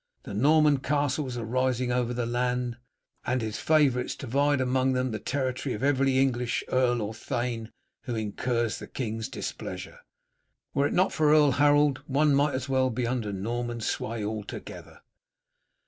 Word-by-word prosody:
The - - -7
Norman 150 +5 +4
castles 140 -2 -1
are 115 - -4
rising 130 +1 0
over 125 -1 0
the 120 -1 -2
land, 125 0 -1 0.5
and 130 - 0
his 110 -1 -4
favourites 140 -6 +2
divide 140 +2 +1
among 130 +1 +1
them 130 -1 0
the 110 - -3
territory 130 -1 -2
of 105 - -6
every 135 -1 +2
English 125 -3 +1
earl 120 -3 +2
or 105 +2 -4
thane 120 -1 -3 0.4
who 120 -3 -3
incurs 115 +2 -1
the - - -8
king's 115 -3 -4
displeasure. - - -6 0.7
Were 140 +1 +2
it - - -4
not 185 +2 +2
for 155 -1 +3
Earl 150 -2 +6
Harold, 145 0 +4
one 145 +2 +3
might 145 +1 +2
as 130 0 -3
well 130 -1 +2
be 120 0 -2
under 120 -3 -2
Norman 120 +4 -3
sway 110 0 -2
altogether." 105 -1 -7
125 Hz, 160 wpm, -27 LUFS, 120-140 Hz, 0.7 s, Earl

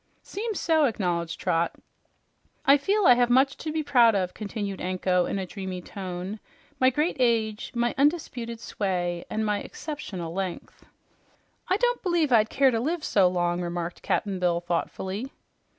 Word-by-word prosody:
"Seems 430 0 -4
so," 320 -2 +3
acknowledged 175 -8 -1
Trot. 170 -2 0 0.9
"I 275 - +8
feel 390 +8 +1
I 250 - +9
have 245 0 +2
much 265 +3 +4
to 310 - -4
be 315 0 -1
proud 240 -6 +5
of," 185 -2 -1
continued 205 -2 -5
Anko 180 0 +1
in - - -2
a 190 - -2
dreamy 190 -1 -6
tone. 185 +2 -6 0.4
"My 260 - +6
great 300 +6 0
age, 225 -3 +1
my 240 0 +1
undisputed 255 -6 0
sway, 175 -6 -2
and 220 0 -1
my 210 -1 0
exceptional 195 - -6
length." 190 -1 -5 0.8
"I 375 - +2
don't 485 +2 +1
b'lieve 345 -6 +1
I'd 220 -2 +5
care 270 -1 +4
to 230 - 0
live 315 +6 -2
so 195 -3 +4
long," 175 -1 0
remarked 175 0 -4
Cap'n 195 -3 -1
Bill 175 -1 +2
thoughtfully. 185 +6 -3
215 Hz, 160 wpm, -26 LUFS, 180-275 Hz, 0.9 s, I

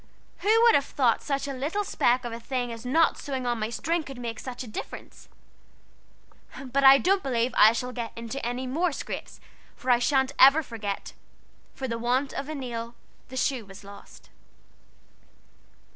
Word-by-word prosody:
Who 445 +3 +4
would 470 -1 +7
have 280 - +3
thought 245 -5 +1
such 275 -1 -2
a 275 - -3
little 300 +11 -2
speck 250 -9 +1
of 235 - -4
a 230 - -6
thing 245 0 -3
as 230 +2 -8
not 320 +5 +3
sewing 265 -3 -4
on 240 -1 -1
my 215 0 -2
string 330 +8 -1
could 270 -4 -10
make 235 -2 -5
a 255 - -4
difference? 215 - -9 1.4
But 270 +2 0
I 270 0 +9
don't 380 +6 +2
believe 245 -2 -1
I 215 - +8
shall 250 +2 -3
get 235 -2 -5
in 230 +2 -6
any 250 0 -3
more 320 +7 0
scrapes, - - -7 0.4
for 255 -2 -1
I 240 - +5
sha'n't 265 +1 +1
ever 275 +4 +7
forget 215 -6 -5 0.6
"'For 265 - -4
the 230 -1 -3
want 250 +4 0
of 275 - -5
a 310 - -4
nail 235 -3 -5 0.3
the 260 - -8
shoe 255 -2 0
was 195 0 -13
lost.'" 200 0 -14
255 Hz, 175 wpm, -26 LUFS, 235-275 Hz, 1.4 s, I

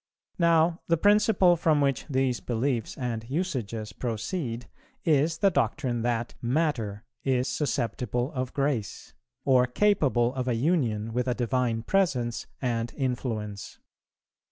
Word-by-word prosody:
Now, 165 0 +3
the 165 - +3
principle 205 -1 +4
from 160 -3 +2
which 140 -3 0
these 130 -2 +1
beliefs 120 -1 -2
and 120 -4 -3
usages 120 - -3
proceed 120 - -3 0.4
is 160 +1 +3
the 195 +2 +3
doctrine 130 -8 0
that 120 0 -1
Matter 120 -6 -1 0.2
is 130 -1 +1
susceptible 125 -2 -1
of 130 -4 -3
grace, 135 -7 -2 0.3
or 125 -2 +4
capable 130 -7 +2
of 130 -1 -3
a 125 - +1
union 115 -6 0
with 125 +1 0
a 125 - +1
Divine 120 -2 0
Presence 125 -10 0
and 120 -2 -1
influence. 115 -7 -3
125 Hz, 125 wpm, -27 LUFS, 115-155 Hz, 0.4 s, principle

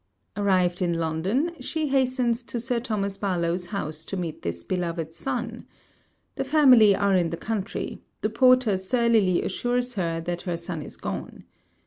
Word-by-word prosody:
Arrived 185 -3 +2
in 175 -1 +1
London, 180 - 0
she 315 -3 -2
hastens 255 -3 +1
to 235 - -4
Sir 240 +1 -1
Thomas 200 -4 -2
Barlowe's 175 -2 -1
house, 155 -6 -4
to 195 - -4
meet 170 -3 -4
this 85 0 -4
beloved 170 -3 -3
son. - - -4 0.7
The - - 0
family 260 -8 +6
are 200 -1 +2
in 175 -2 +2
the 170 - -4
country; 215 0 -4 0.2
the 215 - +1
porter 255 -4 +4
surlily 210 -2 +2
assures 245 0 -1
her 170 -5 -1
that 175 +1 -4
her 175 -3 -3
son 170 -1 -5
is - - -9
gone. - - -6
195 Hz, 155 wpm, -25 LUFS, 175-240 Hz, 0.7 s, family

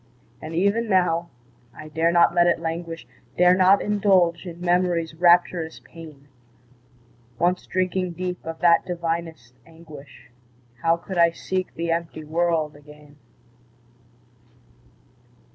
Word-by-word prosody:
And 160 +1 -7
even 200 +6 +1
now, 175 -3 +1 0.5
I 155 - -10
dare 160 +2 0
not 170 0 +4
let 175 0 +4
it 170 - +2
languish, 165 0 -5 0.3
Dare 180 0 +5
not 190 +2 +4
indulge 190 -4 +1
in 170 -1 -9
Memory's 175 -2 0
rapturous 175 -1 +2
pain; 155 -4 -14 1.1
Once 180 +4 0
drinking 185 -1 -2
deep 180 +1 -5
of 165 0 -6
that 170 -1 +4
divinest 165 -7 -5
anguish, 145 -6 -15 0.5
How 165 0 +2
could 175 +1 -6
I 170 0 +6
seek 185 +2 -4
the 165 0 -2
empty 165 -1 -3
world 160 -1 -1
again? 150 0 -17
170 Hz, 120 wpm, -23 LUFS, 160-180 Hz, 1.1 s, I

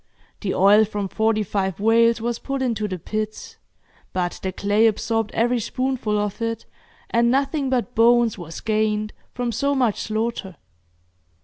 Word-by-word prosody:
The 200 - -2
oil 205 +3 +6
from 205 -2 -3
forty 220 +1 +1
five 190 -2 -2
whales 230 +2 +4
was 235 +1 -2
put 275 -1 -3
into 220 -4 -1
the 185 -2 -4
pits, 215 +5 -5 0.6
but 175 -1 -2
the 190 - -2
clay 205 +4 +2
absorbed 225 0 0
every 240 +2 +2
spoonful 255 -2 -1
of 210 +2 -2
it, 230 -1 -2 0.5
and 235 0 +3
nothing 275 +2 +1
but 250 -1 -1
bones 235 -1 +4
was 170 -3 -8
gained 215 -1 0 0.2
from 245 -1 -1
so 280 +5 0
much 245 -6 +1
slaughter. 215 -3 -3
220 Hz, 150 wpm, -22 LUFS, 210-235 Hz, 0.6 s, oil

